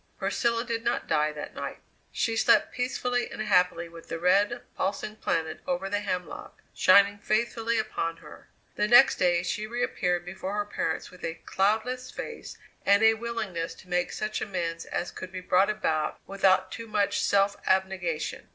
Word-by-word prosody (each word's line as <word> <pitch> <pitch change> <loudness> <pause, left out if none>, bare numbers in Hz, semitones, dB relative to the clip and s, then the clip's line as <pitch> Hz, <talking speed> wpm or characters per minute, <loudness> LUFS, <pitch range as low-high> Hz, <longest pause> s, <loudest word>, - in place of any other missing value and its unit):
Priscilla 235 -1 0
did 230 -1 -3
not - - 0
die 155 -1 +1
that 150 -1 -7
night. - - -5 0.3
She 225 - 0
slept - - +4
peacefully 245 0 -1
and - - -9
happily 180 -5 +2
with 165 0 -13
the - - -3
red, 200 +7 +2
pulsing 210 +2 -2
planet 160 -6 -1
over 265 -8 -2
the 205 - +1
hemlock 185 -3 -5
shining 200 0 +5
faithfully 230 +2 0
upon 215 -6 -2
her. - - -14 0.3
The 210 - +2
next 245 +4 +7
day 175 -1 +2
she 210 +4 -2
reappeared 180 -7 -1
before 190 +2 -5
her 205 0 -1
parents 165 -5 -3
with 180 -1 -15
a 165 - -3
cloudless 225 +6 0
face 465 - -7 0.3
and 200 +2 +4
a 220 0 +7
willingness 220 -7 -4
to 185 - -17
make 180 0 0
such 215 0 -3
amends 170 -4 -3
as 175 - -3
could 185 -1 -8
be 185 - -5
brought 185 +2 +3
about 160 -8 -1
without 190 -1 +2
too 230 - -7
much 205 -2 +1
self 200 0 +3
abnegation. 190 -4 -1
200 Hz, 170 wpm, -27 LUFS, 180-220 Hz, 0.3 s, next